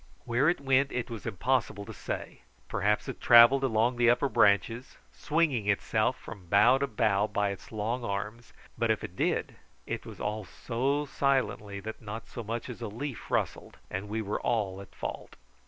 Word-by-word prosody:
Where 125 +6 +3
it 175 - 0
went 135 0 +2
it 125 -1 -3
was 115 -2 -6
impossible 115 -2 0
to - - -8
say; - - -6 0.3
perhaps 105 +1 0
it - - -6
travelled 120 +3 +8
along 120 0 +2
the 120 0 +4
upper 120 +4 +3
branches, 115 +4 +2 0.2
swinging 145 -9 0
itself 110 +4 +1
from 100 -6 -11
bough 105 +8 +5
to 140 - 0
bough 105 -3 +1
by 105 -1 0
its 100 - -9
long 115 +3 -2
arms; 105 +3 -4 0.3
but 115 -1 +1
if 110 - +1
it 90 - -7
did, - - -1 0.3
it - - -4
was - - -10
all 105 +1 -2
so 135 +8 -1
silently 115 -8 0
that 110 +2 -7
not 110 +1 -7
so 120 - -7
much 115 +2 -4
as 125 -1 -8
a 115 - -3
leaf 120 +5 -6
rustled, - - -2
and 95 +2 -4
we 110 +1 -2
were 105 +1 -3
all 100 -4 -1
at 100 - -14
fault. - - -6
115 Hz, 185 wpm, -29 LUFS, 105-125 Hz, 0.3 s, travelled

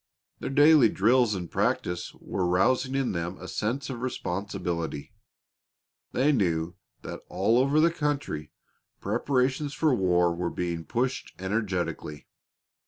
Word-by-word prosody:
Their - - -4
daily 145 -3 +6
drills 115 +2 +3
and 90 -2 -4
practice 90 0 -1
were 90 -2 -2
rousing 130 +9 +2
in 135 -2 +1
them 85 +1 -3
a - - -8
sense 130 +7 -2
of 125 -3 -5
responsibility. 90 - -3 1.0
They 135 +4 +3
knew 85 - 0 0.3
that - - -7
all 105 +6 +2
over 140 +4 +3
the 165 +2 +5
country 140 - -2 0.5
preparations 135 +2 0
for 155 -4 +2
war 90 -5 +3
were 85 0 -2
being 85 -2 -3
pushed 130 +2 -2
energetically. 95 -6 -3
105 Hz, 125 wpm, -27 LUFS, 90-135 Hz, 1.0 s, daily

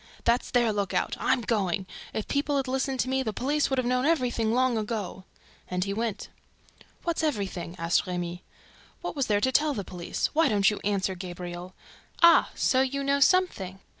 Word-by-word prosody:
"That's 235 +1 +2
their 240 -3 +2
lookout! 200 -2 -1
I'm 260 - +2
going! 195 -4 0 0.3
If 220 - -4
people 285 0 0
had 270 -1 -1
listened 265 0 -1
to - - -2
me, 265 0 +1
the 225 -4 -2
police 290 +7 0
would 270 - 0
have 255 - +1
known 250 +1 +1
everything 245 -8 +1
long 255 0 +2
ago!" 210 -4 -3 0.4
And 180 0 -1
he 200 +1 -2
went. 225 0 -3 0.8
"What's 340 -1 -1
everything?" 200 - -2
asked 165 +3 +1
Remy. 175 0 -4 0.6
"What - - -4
was 275 -3 0
there 205 -1 +2
to 260 - +2
tell 295 +2 +2
the 200 - -3
police? 175 -2 -3
Why 315 -1 +4
don't 205 -2 +4
you 210 - -4
answer, 195 -2 0
Gabriel?... 180 0 -7 0.5
Ah, 340 0 +7
so 260 - +3
you 275 +1 -1
know 280 0 +2
something! 275 - +2
230 Hz, 185 wpm, -27 LUFS, 190-265 Hz, 0.8 s, Ah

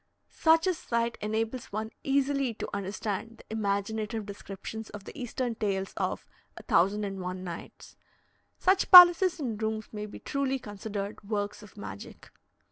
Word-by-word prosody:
Such 325 +1 +4
a 370 - +2
sight 235 -6 -2
enables 225 +4 -2
one 220 +2 -3
easily 275 -3 +1
to - - -5
understand 200 +3 -4
the - - -8
imaginative 215 +1 -2
descriptions 200 +2 -8
of 205 -1 -9
the - - -11
Eastern 245 0 -3
tales 195 -3 -2
of - - -2 0.3
"a - - -9
thousand 195 +5 +2
and 195 -1 -4
one 185 +1 -5
nights." 170 -2 -9 0.6
Such 380 +1 +2
palaces 355 0 +10
and 230 -7 -3
rooms 220 0 -2
may 210 0 -5
be 210 - -9
truly 275 -1 -1
considered 205 -3 -6
works 205 -1 -2
of 210 -2 -15
magic. 100 -1 -9
220 Hz, 150 wpm, -29 LUFS, 200-250 Hz, 0.6 s, palaces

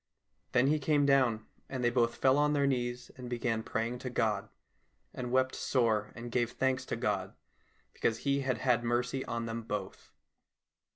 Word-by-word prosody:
Then 125 - +4
he 150 +2 +3
came 145 0 +2
down, 130 -6 +3 0.2
and 130 -2 -3
they 120 - +3
both 120 -1 +2
fell 135 +2 +3
on 150 0 +3
their 140 -1 +2
knees 125 -2 -1
and 125 -1 -7
began 120 -2 -1
praying 115 +2 -2
to 125 - -4
God, 110 -4 0 0.6
and 125 -1 -4
wept 130 0 +2
sore 110 -5 +1
and 120 0 -7
gave 120 0 0
thanks 130 0 0
to - - -1
God 105 -6 -2 0.6
because 115 - 0
He 140 0 +2
had 130 -3 0
had 125 -1 +2
mercy 125 +2 0
on 115 0 -3
them 115 0 -3
both. 105 -4 -6
120 Hz, 175 wpm, -32 LUFS, 115-130 Hz, 0.6 s, Then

